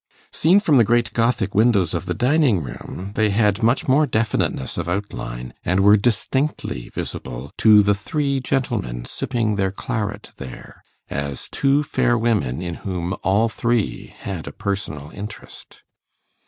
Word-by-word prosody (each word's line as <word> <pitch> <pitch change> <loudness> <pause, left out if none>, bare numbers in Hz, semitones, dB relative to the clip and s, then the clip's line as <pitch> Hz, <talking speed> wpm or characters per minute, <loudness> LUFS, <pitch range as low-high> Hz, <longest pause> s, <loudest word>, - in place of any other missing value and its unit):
Seen 175 +6 +4
from 155 -9 +3
the 120 - +7
great 120 -1 +1
Gothic 115 -4 +1
windows 105 -6 +3
of 90 +2 -3
the 90 - -1
dining 125 - +3
room, 90 +9 -7
they 110 0 +2
had 105 0 +2
much 115 +3 +2
more 145 +3 +4
definiteness 110 - -1
of 85 -1 -3
outline, 65 -11 -4
and 95 +3 +2
were 100 +2 +7
distinctly 120 - -1
visible 65 +4 -6
to 105 -2 +7
the 100 0 +3
three 140 +6 -1
gentlemen 115 - -2
sipping 115 -5 -1
their 95 -1 +1
claret 105 +1 -4
there, 65 -2 -10 0.3
as 70 -1 -3
two 140 +1 +2
fair 120 -4 +1
women 90 - 0
in 85 -1 -3
whom 90 -2 -3
all 100 +4 +3
three 115 -1 -1
had 95 -5 -5
a - - -5
personal 80 -7 -4
interest. 105 +2 -10
105 Hz, 150 wpm, -22 LUFS, 90-120 Hz, 0.3 s, the